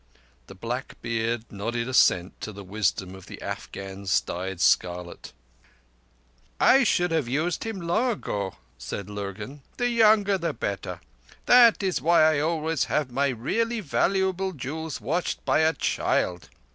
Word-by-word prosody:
The 95 - -11
black 120 +7 -5
beard 115 0 -1
nodded 115 +4 -3
assent 95 -8 +2
to 110 - -5
the 100 -1 -10
wisdom 95 -1 -1
of 95 -1 -12
the - - -9
Afghan's 95 0 -3
dyed 95 +1 -5
scarlet. 90 0 0 1.3
"I 270 +1 +6
should 175 -6 +2
have 160 -6 0
used 155 - -1
him 225 -3 -4
long 175 +9 +1
ago," 100 - -3 0.2
said 100 0 -6
Lurgan. 105 +7 -6 0.2
"The 245 0 +1
younger 215 -4 +4
the 170 - -2
better. - - -4 0.4
That 240 -4 +6
is 185 -8 0
why 165 +2 +5
I 155 -2 +4
always 160 -1 0
have 145 -4 -1
my 140 +3 +1
really 225 - -1
valuable 190 +2 0
jewels 155 +2 -5
watched 170 +5 -2
by - - +3
a 160 0 +4
child. 90 - -1
140 Hz, 145 wpm, -26 LUFS, -, 1.3 s, I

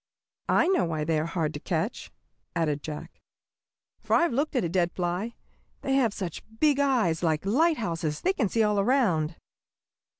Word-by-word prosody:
"I - - +4
know 380 - +3
why 160 -2 -2
they 155 0 +1
are 155 - -2
hard 160 -3 -1
to 145 - -5
catch," 165 +8 -2 0.5
added 150 -3 0
Jack, 150 0 -8 0.8
"for - - +1
I've 340 -6 +3
looked 285 +4 -1
at 250 - +2
a - - +1
dead 175 0 +1
fly. 180 +6 -2 0.5
They 270 - 0
have 260 -5 +3
such 185 -5 -5 0.2
big 295 -2 +3
eyes, 245 -13 +2
like 160 -1 0
lighthouses, 205 - +1
they 375 - +2
can 225 - 0
see 225 +2 +2
all 210 -1 +2
around." 195 - +2
185 Hz, 170 wpm, -27 LUFS, 160-260 Hz, 0.8 s, I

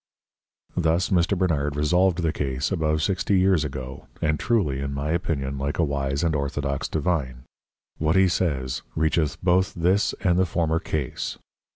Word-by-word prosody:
Thus 85 +1 +1
Mr. 90 +2 +2
Bernard 75 -6 0
resolved 90 +4 +2
the 80 - +1
Case 70 +1 -2
above 80 -3 0
sixty 95 +2 +1
Years 95 -4 +3
ago; 65 -2 -6
and 75 0 0
truly 95 - +1
in 70 0 -3
my 70 +2 -2
Opinion 70 -6 -2
like 70 +1 -2
a 85 - +3
Wise 70 0 -1
and 80 -2 +1
Orthodox 70 -1 -2
Divine, 70 -6 -2 0.6
what 80 +1 +1
he 95 0 +5
says, 65 -8 -1
reacheth 80 -1 +1
both 90 +1 +2
this 90 +4 +2
and 90 -2 +2
the 95 - +3
former 80 -1 0
Case. 75 -6 -3
80 Hz, 160 wpm, -24 LUFS, 70-90 Hz, 0.6 s, he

